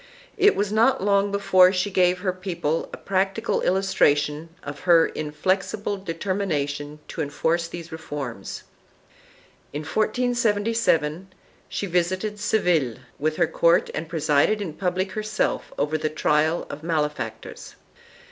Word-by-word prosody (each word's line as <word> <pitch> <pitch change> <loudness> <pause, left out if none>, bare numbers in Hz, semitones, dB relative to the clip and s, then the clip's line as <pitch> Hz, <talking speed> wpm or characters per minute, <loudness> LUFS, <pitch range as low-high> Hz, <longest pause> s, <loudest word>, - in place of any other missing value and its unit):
4 410 -2 +1
It 415 - +6
was 205 0 -1
not 230 +2 +3
long 200 0 +2
before 185 -2 +5
she 190 +2 -1
gave 180 -1 +2
her 185 -2 0
people 175 -4 -2
a - - -7
practical 195 +4 0
illustration 155 -5 +1
of 145 0 -7
her 170 -2 +5
inflexible 185 +7 -2
determination 165 -6 -3
to - - -4
enforce 160 +3 0
these 170 -1 -8
reforms. 140 -9 -6 1.1
In 145 - -3
1477 215 -5 +1 0.4
she - - -3
visited 185 +4 -1
Seville 170 - +1 0.2
with 155 +1 0
her 170 - +3
court 170 +1 +2
and 155 0 -4
presided 160 +5 +2
in 185 -7 -4
public 185 +2 -1
herself 215 +1 -2
over 155 +2 0
the 155 - -1
trial 155 +2 +1
of 145 - -8
malefactors. 155 -2 -3
180 Hz, 130 wpm, -24 LUFS, 155-200 Hz, 1.1 s, It